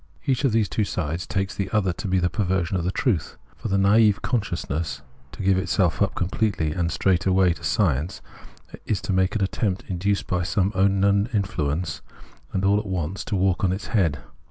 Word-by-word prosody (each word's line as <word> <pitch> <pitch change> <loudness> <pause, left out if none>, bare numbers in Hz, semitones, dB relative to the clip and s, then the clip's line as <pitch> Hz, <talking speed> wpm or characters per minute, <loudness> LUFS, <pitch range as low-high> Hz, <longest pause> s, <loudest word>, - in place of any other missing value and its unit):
Each 135 0 +1
of 135 - +3
these 110 -1 +2
two 110 - 0
sides 85 -3 -3
takes 95 +2 -1
the 100 -2 -3
other 95 -3 +1
to 100 - -6
be 95 0 +2
the 90 -1 +2
perversion 95 0 -1
of 90 - 0
the 90 - 0
truth. 100 - -1 0.2
For - - -6
the 100 -2 +1
naive 105 +1 +4
con 125 -4 +1
sciousness 80 -7 -4 0.3
to - - -7
give 95 0 +3
itself 95 -1 +1
up 100 - +1
completely 90 -3 0
and 85 0 -1
straight 90 +2 +1
away 95 -2 +4
to - - -14
science 80 - 0 0.7
is 105 - 0
to 95 - -2
make 95 +2 +1
an 105 - +1
attempt, 95 -1 -1
induced 95 +2 -1
by 90 -1 -1
some 95 +2 +1
unkno 95 -1 +2 0.2
wm - - -10
influence, 80 -5 -1 0.6
all 100 +1 +4
at 105 - -6
once 90 0 -3
to 105 - -2
walk 95 -1 +1
on 95 - +3
its 95 +2 -4
head. 85 -9 +2
95 Hz, 205 wpm, -24 LUFS, 90-100 Hz, 0.7 s, naive